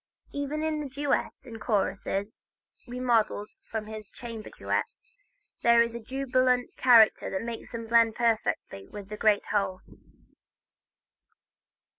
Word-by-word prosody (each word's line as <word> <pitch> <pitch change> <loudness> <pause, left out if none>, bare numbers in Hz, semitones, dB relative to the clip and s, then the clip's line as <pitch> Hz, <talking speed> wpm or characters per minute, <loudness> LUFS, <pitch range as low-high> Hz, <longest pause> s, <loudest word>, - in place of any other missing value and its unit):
Even 285 +2 -3
in 315 -1 0
the 285 - -5
duet 280 +2 0
and 225 -3 -9
choruses 200 0 -1 0.5
remodeled 240 -4 +1 0.2
from 220 -1 -3
his 215 -1 -8
chamber 230 -3 -8
duets, - - -4 0.5
there 235 0 +6
is 235 0 -4
that 235 -2 -7
jubilant 255 -2 +1
character 235 -4 +6
that 190 +3 -3
makes 230 -1 -6
them 230 -1 -5
blend 230 -1 +4
perfectly 220 - -1
with 205 -1 -9
the 210 - -6
great 210 -2 +3
whole. 195 -3 0
230 Hz, 125 wpm, -28 LUFS, 215-250 Hz, 0.5 s, there